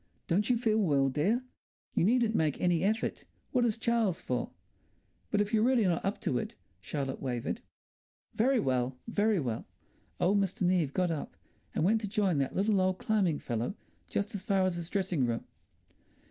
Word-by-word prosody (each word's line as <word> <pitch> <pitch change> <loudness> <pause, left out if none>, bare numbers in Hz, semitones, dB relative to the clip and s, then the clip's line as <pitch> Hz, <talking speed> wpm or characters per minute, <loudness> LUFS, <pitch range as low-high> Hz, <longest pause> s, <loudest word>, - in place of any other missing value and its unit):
"Don't 205 +7 +1
you 245 - +4
feel 220 -2 +2
well, 140 -8 +3
dear?" 195 - +1 0.5
"You - - +2
needn't 230 +2 +3
make 155 -8 +1
any 175 -2 +2
effort. 220 +3 0 0.3
What 250 -2 +3
is 225 -2 +1
Charles 225 -6 +1
for?" 125 -1 -2 0.8
"But 205 - +2
if 205 +1 -2
you're 215 - +4
really 245 0 +4
not 175 -3 +1
up 195 +1 -1
to - - 0
it," 220 +1 -5 0.2
Charlotte 135 -3 -4
wavered. 125 -3 -2 0.7
"Very 255 +3 +3
well! 130 - 0
Very 215 -2 +2
well!" 120 -7 -3 0.5
Old 200 +3 +3
Mr. 195 -1 -1
Neave 175 -5 +2
got 180 -2 +2
up 155 - -5 0.4
and - - +1
went 215 +5 +3
to 210 - -3
join 195 -7 +1
that 135 - -1
little 200 0 +2
old 185 0 +1
climbing 190 -9 +1
fellow 120 - -3 0.3
just 200 +3 -2
as 200 - -4
far 195 -1 +2
as 185 - +1
his 170 -1 -5
dressing 185 -10 0
room.... 115 -1 -2
190 Hz, 180 wpm, -31 LUFS, 155-220 Hz, 0.8 s, you